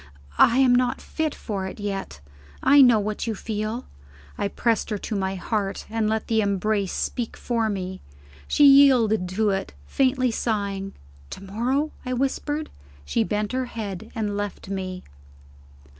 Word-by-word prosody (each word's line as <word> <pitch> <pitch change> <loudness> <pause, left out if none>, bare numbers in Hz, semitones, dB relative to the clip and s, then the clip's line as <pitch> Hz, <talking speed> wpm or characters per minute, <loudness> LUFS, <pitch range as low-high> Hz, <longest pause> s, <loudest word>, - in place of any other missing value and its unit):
"I 235 - +6
am 260 -2 +5
not 245 0 +2
fit 315 -2 -3
for 195 -4 -4
it 190 - -8
yet; 195 - -4 0.4
I 280 +1 +7
know 245 -4 +7
what 210 +2 -3
you 225 - -1
feel." 215 +4 -4 0.5
I - - -1
pressed 230 +3 0
her 210 - -1
to 210 - -4
my 190 -1 -1
heart, 200 +1 -2
and 220 -1 0
let 220 0 -1
the 220 -1 +2
embrace 200 -1 0
speak 240 -3 -3
for 230 -2 -1
me. 185 -2 -4 0.5
She 290 - +4
yielded 250 -9 +6
to 205 +3 +1
it, 195 - -3
faintly 255 - +1
sighing. 200 -4 -2 0.4
"To 195 - -8
morrow?" 250 +10 -1
I 255 - -3
whispered. 290 +4 -2 0.3
She 70 +10 +1
bent 210 +2 -2
her 255 0 -1
head, 220 -3 -6
and 210 -3 -2
left 205 -1 -5
me. 185 -2 -4
215 Hz, 160 wpm, -24 LUFS, 195-245 Hz, 0.5 s, I